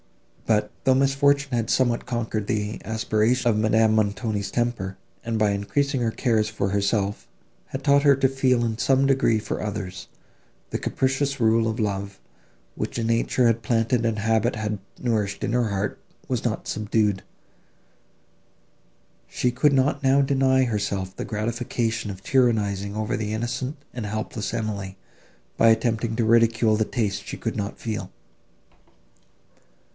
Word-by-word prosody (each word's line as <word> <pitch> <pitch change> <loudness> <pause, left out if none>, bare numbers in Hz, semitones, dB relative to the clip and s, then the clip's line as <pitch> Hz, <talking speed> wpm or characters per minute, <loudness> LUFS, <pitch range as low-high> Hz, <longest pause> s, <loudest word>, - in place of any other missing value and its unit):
But, 105 -1 +2
though 130 -1 +4
misfortune 140 0 +2
had 115 -1 -1
somewhat 120 -2 +1
conquered 110 -4 -2
the 105 0 -2
asperities 110 +3 0
of 115 -3 +3
Madame 110 +1 +3
Montoni's 105 -1 0
temper, 120 -6 -2 0.3
and, 115 -1 -2
by 105 -1 +3
increasing 135 +7 -1
her 115 - +1
cares 110 -3 +1
for 100 -2 -2
herself, 100 +1 -1 0.4
had 135 +1 -6
taught 140 0 +5
her 140 -2 +6
to 135 -1 +3
feel 130 -2 +1
in 110 -1 -3
some 135 +1 +3
degree 135 -4 +3
for 105 0 -4
others, 100 -3 -5 0.6
the - - -2
capricious 135 +1 -1
love 115 0 +3
of 110 +2 -2
rule, 100 -2 -1 0.7
which - - -4
nature 115 +2 +1
had 115 0 +3
planted 115 +1 +1
and 115 -1 0
habit 115 +3 +1
had 105 -1 -3 0.2
nourished 105 -5 -1
in - - -1
her 120 -3 +1
heart, 100 +1 -3 0.3
was - - -2
not - - -2
subdued. 105 -2 0 2.0
She 125 - 0
could 145 +4 +3
not 140 +1 +2
now 135 +1 +4
deny 135 -1 +3
herself 100 -5 -2
the - - -5
gratification 115 0 -2
of 95 -1 -8
tyrannising 105 -6 +1
over 110 +3 -1
the 105 -2 -3
innocent 120 +5 -3 0.2
and 120 -4 -4
helpless 110 0 -4
Emily, 100 -4 -4 0.6
by 115 - +5
attempting 115 0 +1
to 115 -1 +1
ridicule 115 -1 +4
the 110 0 +1
taste 105 -5 -2
she - - -6
could - - -3
not 100 0 -4
feel. 110 -3 -4
115 Hz, 150 wpm, -24 LUFS, 105-125 Hz, 2.0 s, her